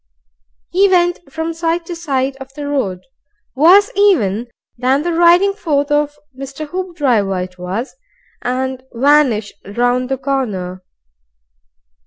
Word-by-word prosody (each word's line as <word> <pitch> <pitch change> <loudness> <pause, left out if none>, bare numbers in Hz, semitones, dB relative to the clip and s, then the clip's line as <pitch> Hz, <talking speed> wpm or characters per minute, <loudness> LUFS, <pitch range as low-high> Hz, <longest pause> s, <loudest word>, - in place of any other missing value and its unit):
He 390 +2 +4
went 350 -1 +2
from 320 +1 -3
side 335 +1 -1
to 345 - -6
side 275 -5 -1
of 270 0 -10
the 290 -1 -5
road, 205 -11 -1 0.5
worse 360 +9 +5
even 245 - +2 0.3
than 260 +4 +1
the 345 0 -1
riding 345 +4 +5
forth 295 -7 -1
of 295 0 +1 0.2
Mr. 275 +3 -7
Hoopdriver 280 - 0
it 180 0 -11
was, 190 +9 -4 0.5
and 260 +1 -2
vanished 255 -5 +3
round 245 +4 0
the 270 - -1
corner. 205 -10 -3
275 Hz, 125 wpm, -17 LUFS, 245-335 Hz, 0.5 s, worse